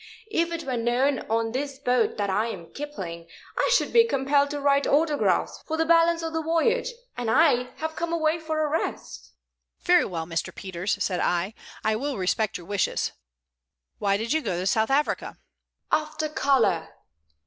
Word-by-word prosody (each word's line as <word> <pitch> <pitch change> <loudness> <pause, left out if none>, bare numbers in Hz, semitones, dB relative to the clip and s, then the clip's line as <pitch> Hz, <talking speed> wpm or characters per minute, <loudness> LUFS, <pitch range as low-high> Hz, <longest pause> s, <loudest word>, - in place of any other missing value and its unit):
If 335 -4 +1
it 335 -1 -3
were 260 -2 -2
known 245 +4 +1
on 225 0 0
this 275 +2 -3
boat 250 -4 +1
that 200 -2 0
I 215 +4 +1
am 175 -7 -8
Kipling, 185 - -6 0.3
I - - +1
should - - +2
be 465 - +8
compelled 280 - +2
to 290 0 -3
write 280 0 +2
autographs 300 0 +1
for 320 - -2
the 325 - +2
balance 335 0 +4
of 325 0 -3
the 320 - 0
voyage, 335 +11 +1 0.3
and 240 -2 -3
I 250 -3 +4
have 315 0 -4
come 340 0 -3
away 325 -1 +1
for 315 -1 -1
a - - 0
rest." 315 +2 -4 0.5
"Very 355 -1 +5
well, 165 -4 -4
Mr. 165 -1 -3
Peters," 185 +1 -3
said 180 -2 -1
I. 175 +4 0 0.3
"I 215 0 +2
will 275 +2 -3
respect 195 +3 0
your 175 - -12
wishes. 200 -1 0 0.9
Why 200 -1 +2
did 230 +5 -1
you 315 - +1
go 180 - -2
to 185 - -3
South 220 +4 +2
Africa?" 285 +2 0 0.5
"After 310 0 0
color. 275 -6 +1
275 Hz, 180 wpm, -26 LUFS, 215-315 Hz, 0.9 s, be